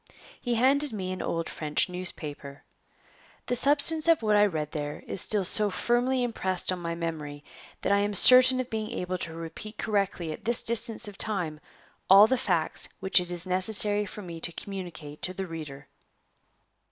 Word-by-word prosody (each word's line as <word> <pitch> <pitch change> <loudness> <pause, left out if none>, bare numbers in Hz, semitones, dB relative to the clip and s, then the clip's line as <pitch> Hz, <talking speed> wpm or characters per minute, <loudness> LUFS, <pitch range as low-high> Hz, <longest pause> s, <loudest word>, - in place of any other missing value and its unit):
He 245 -2 -2
handed 275 +5 +2
me 190 -4 -5
an 185 - -6
old 165 0 -4
French 150 +2 -2
newspaper. 150 -6 -5 0.8
The 245 - -2
substance 295 +5 +6
of 330 -7 +2
what 215 -1 +1
I 205 0 +4
read 155 -5 -5
there 145 -1 -6
is 185 - -3
still 205 -3 0
so 210 +3 +7
firmly 245 +5 -1
impressed 190 -7 -3
on 185 - -4
my 170 -1 -5
memory 155 -4 -7 0.4
that - - -1
I 200 - +3
am 205 0 -2
certain 255 +3 +7
of 255 -1 -5
being 220 -1 -4
able 180 0 -5
to 165 - -7
repeat 165 +6 -9
correctly 195 -6 -3
at - - -10
this 235 +1 0
distance 230 0 +1
of 200 -1 -12
time 175 -8 -3 0.5
all 195 +2 +8
the 260 - 0
facts 175 -9 -2
which 190 - +2
it 180 -1 -6
is 175 0 -4
necessary 205 +2 +3
for 210 - -10
me 170 -2 -9
to 170 - 0
communicate 170 -6 -9
to 185 - -4
the 190 - -5
reader. 150 -5 -10
190 Hz, 180 wpm, -26 LUFS, 165-220 Hz, 0.8 s, all